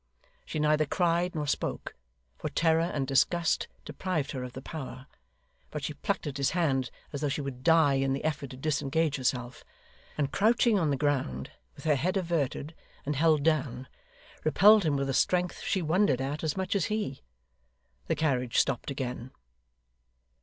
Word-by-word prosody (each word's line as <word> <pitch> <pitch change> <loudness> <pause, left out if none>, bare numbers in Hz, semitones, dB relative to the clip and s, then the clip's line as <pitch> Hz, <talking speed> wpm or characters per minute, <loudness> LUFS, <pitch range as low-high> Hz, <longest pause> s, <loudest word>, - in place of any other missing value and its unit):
She - - -4
neither 150 0 +2
cried 175 +2 +1
nor 150 -1 -1
spoke, - - -2 0.4
for - - -4
terror 165 -1 +2
and 140 -3 -1
disgust 160 +5 +2 0.2
deprived 180 -7 -2
her 130 - -4
of 125 -1 -6
the 130 - -7
power; 135 -4 -7 0.6
but - - -5
she - - -3
plucked - - -2
at 145 -2 -4
his 140 -1 +2
hand 135 -7 +1 0.2
as 140 - -4
though 145 - 0
she 145 - -2
would 135 -3 -6
die 160 -4 +5
in 135 0 +1
the 135 +2 -2
effort 145 -3 -2
to 130 - -9
disengage 145 +1 0
herself; 125 -1 -2 0.5
and 145 -2 0
crouching 225 0 +3
on 160 -4 +1
the 140 - +1
ground, 130 - -1 0.2
with - - -13
her 155 - +4
head 180 +8 0
averted 165 -4 -1 0.3
and 150 +1 -1
held 155 0 +3
down, 135 -5 0 0.6
repelled 205 +5 +6
him 150 -2 +2
with 140 0 -1
a 135 - -1
strength 180 +5 +1
she 190 - 0
wondered 160 -4 +2
at 140 +4 -3
as 155 +2 -1
much 190 +1 -1
as 195 - +2
he. 210 -11 -3 0.9
The - - +1
carriage 125 -6 0
stopped 135 -1 +1
again. 125 -2 -4
150 Hz, 175 wpm, -29 LUFS, 135-165 Hz, 0.9 s, repelled